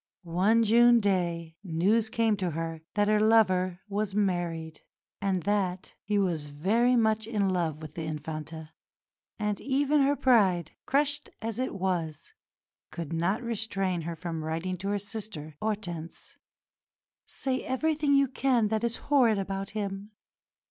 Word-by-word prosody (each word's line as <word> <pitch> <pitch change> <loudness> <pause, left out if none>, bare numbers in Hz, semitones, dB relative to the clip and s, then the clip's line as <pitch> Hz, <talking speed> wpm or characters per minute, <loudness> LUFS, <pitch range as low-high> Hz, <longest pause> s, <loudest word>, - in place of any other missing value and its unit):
One 190 +7 +3
June 235 +2 +6
day 170 -5 -1
news 200 +6 +1
came 225 -1 +2
to 185 -2 -1
her 165 0 -4
that 205 0 +2
her 215 0 +3
lover 185 -5 +3
was 205 -1 -2
married 170 -5 -1 0.4
and 190 -3 0
that 195 -3 -1
"he 205 0 -1
was 170 -7 0
very 220 +12 +2
much 220 -2 +2
in 210 -4 +1
love 165 -4 -1
with 155 -1 -8
the 165 0 -5
Infanta"; 155 +1 -6 0.7
and 210 -2 -2
even 285 +2 +2
her 280 +1 +3
pride, 195 - +3 0.2
crushed 290 +1 +1
as 225 +1 -4
it 255 -4 -2
was, 175 -5 -2 0.6
could 165 -1 -6
not 180 +8 0
restrain 200 -6 -2
her 165 +1 -4
from 165 -1 -5
writing 165 +4 -2
to 195 - -4
her 205 - +1
sister, 200 -7 -7
Hortense, 180 -7 -4 0.9
"Say 260 -1 -2
everything 295 +1 +1
you 275 0 +4
can 250 -4 +1
that 220 +1 -1
is 235 -1 0
horrid 250 -7 +3
about 195 0 -3
him. 200 0 -4
195 Hz, 145 wpm, -28 LUFS, 170-225 Hz, 0.9 s, June